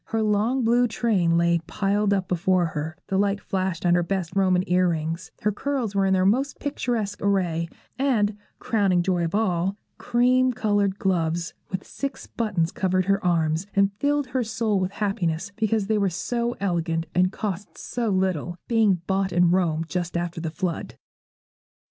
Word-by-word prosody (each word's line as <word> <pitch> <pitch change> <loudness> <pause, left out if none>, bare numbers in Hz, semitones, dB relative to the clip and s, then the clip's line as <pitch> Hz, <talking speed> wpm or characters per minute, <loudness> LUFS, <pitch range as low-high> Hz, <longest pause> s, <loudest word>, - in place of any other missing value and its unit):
Her 225 -1 -1
long 215 +5 +1
blue 240 +2 +4
train 195 -8 +1
lay 170 0 +3
piled 200 +2 +1
up 190 -2 +1
before 180 0 +2
her, 155 +2 -4
the 195 -1 0
light 200 0 +1
flashed 185 -3 -2
on 175 - +4
her 175 - +4
best 175 -1 -2
Roman 185 -2 +3
ear 180 0 +3
rings, 165 +2 -3
her 210 - +3
curls 250 -1 -2
were 195 -1 +2
in 190 - +3
their 185 0 +2
most 260 +8 +1
picturesque 235 -8 -2
array, 175 -5 0 0.3
and 220 -7 +2 0.2
crowning 200 -7 +1
joy 175 -2 +1
of 165 - -2
all 190 -2 0 0.2
cream 250 +1 +3
coloured 205 -3 +1
gloves, 170 -3 0 0.2
with 190 0 -4
six 275 -1 -5
buttons, 195 -7 -1
covered 185 -1 0
her 195 +1 +1
arms, 165 0 +1
and 200 0 +3
filled 290 0 +1
her 255 -1 0
soul 220 -2 0
with 185 +1 -2
happiness, 195 -3 -1
because 220 -1 +1
they 215 +1 +1
were 200 -1 +2
so 235 +7 -2
elegant 170 -4 -1
and 185 +1 +3
cost 200 -1 -5
so 235 -2 -2
little, 185 -3 0
being 210 -7 +2
bought 190 0 0
in 175 -1 +4
Rome 165 -3 +1
just 175 +1 -2
after 170 -1 -3
the 165 - -2
flood. 170 0 -4
195 Hz, 175 wpm, -24 LUFS, 175-215 Hz, 0.3 s, blue